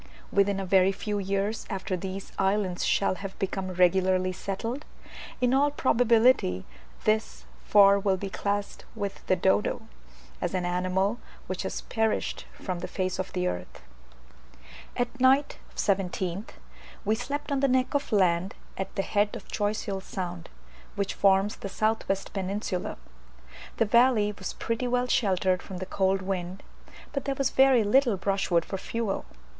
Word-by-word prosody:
Within 200 0 +2
a 195 - -3
very 190 0 +4
few 205 +1 -3
years 200 +3 -2
after 190 -2 -2
these 190 +2 -6
islands 195 -2 +1
shall 195 - +2
have 195 -1 -6
become 190 -1 -2
regularly 185 +1 +3
settled, 225 +9 -4 0.6
in 250 0 +2
all 280 +2 +4
probability 235 - +3 0.4
this 215 +1 0 0.2
for 200 -1 +6
will 195 -1 +1
be 200 - -4
classed 200 +1 -3
with 200 -3 -4
the 185 - +4
dodo, 190 +5 +1 0.6
as 175 +1 -1
an 180 -1 0
animal 185 +5 0 0.3
which - - -4
has - - -3
perished 225 -2 -1
from 185 -3 -5
the 180 - -4
face 185 -1 -2
of 185 - -3
the 180 -1 -1
earth. 90 - -5 1.1
At 245 +1 -2
night 265 +3 +3 0.2
(17th) 190 0 -1 0.6
we 215 - +3
slept 285 +6 -4
on 280 - +1
the 275 - +3
neck 255 +1 +1
of 285 -2 -1
land 185 -2 +2 0.2
at 190 0 -4
the 195 - 0
head 205 +1 +1
of - - -9
Choiseul 205 -2 -2
Sound, 180 -3 -5 0.5
which 200 -1 -1
forms 195 +1 +3
the 195 - -6
south 215 +3 0
west 195 0 -2
peninsula. 195 -1 -3 0.8
The 225 - +3
valley 235 -1 +4
was 195 -2 -5
pretty 230 +2 -2
well 245 0 +1
sheltered 190 -6 +2
from 190 - -8
the 185 - -4
cold 190 0 +1
wind, 185 0 -4 0.5
but 275 - -2
there 275 -1 -1
was 270 -1 0
very 265 -3 +5
little 235 0 +3
brushwood 195 -3 +1
for 195 - -4
fuel. 230 -2 -3
195 Hz, 155 wpm, -27 LUFS, 185-225 Hz, 1.1 s, for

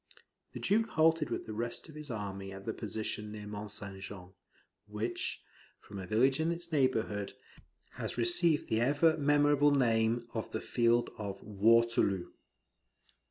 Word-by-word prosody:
The - - -6
Duke 225 +2 +2
halted 160 -4 +3
with 120 - -3
the 110 - -6
rest 120 +4 -4
of 155 - -12
his 150 -1 -8
army 100 -3 -5
at 95 0 -9
the 110 - -2
position 105 -1 -4
near 105 -1 -7
Mont 105 0 -6
St. 100 -2 -8
Jean, 95 -2 -9 0.6
which, 110 +3 -3 0.4
from 100 - -9
a 95 - -6
village 130 - +3
in 160 +1 +1
its 170 0 -6
neighbourhood, 115 -8 0 0.6
has - - -4
received 150 +7 +2
the 110 +1 +1
ever 150 +5 +4
memorable 145 0 +4
name 115 -3 +2
of 110 - -4
the 110 - -1
field 120 0 +2
of 100 -2 -5
Waterloo. 105 -2 +3
115 Hz, 155 wpm, -32 LUFS, 105-145 Hz, 0.6 s, ever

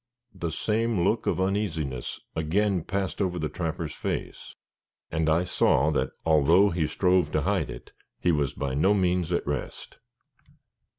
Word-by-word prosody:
The 85 -3 -4
same 110 +3 0
look 105 +5 +1
of - - +1
uneasiness 85 - -2 0.2
again 90 +3 +1
passed 100 +2 -2
over 90 -2 0
the 75 -2 -2
trapper's 80 -3 -4
face; - - -5 0.6
and 80 0 +1
I 80 +3 +3
saw 90 - +2
that - - 0 0.2
although 80 +6 +5
he 85 -2 0
strove 90 +3 +2
to - - +2
hide - - 0
it, - - -9 0.3
he 90 - +2
was 75 -4 0
by 70 -2 -3
no 95 +9 +3
means 90 -3 +1
at 85 - 0
rest. 70 -2 -5
90 Hz, 155 wpm, -27 LUFS, 80-95 Hz, 0.6 s, although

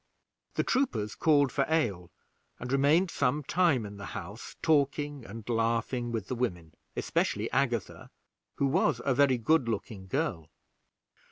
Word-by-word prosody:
The - - +1
troopers 240 - 0
called 145 -4 +3
for 140 - +1
ale, 105 - 0 0.5
and 125 +1 -5
remained 150 +7 +3
some 145 +2 0
time 155 -7 +2
in 100 0 -8
the 100 -1 -7
house, 100 +7 -8
talking 145 -2 +1
and 105 +2 -9
laughing 115 +1 0
with 110 -3 -3
the - - -3
women, 90 -10 -3 0.2
especially - - -1
Agatha, - - -1 0.5
who 140 - +1
was 145 -2 +2
a 135 - +3
very 130 -1 +4
good 120 +1 +2
looking 105 -4 -4
girl. 95 - -2
125 Hz, 145 wpm, -29 LUFS, 110-145 Hz, 0.5 s, very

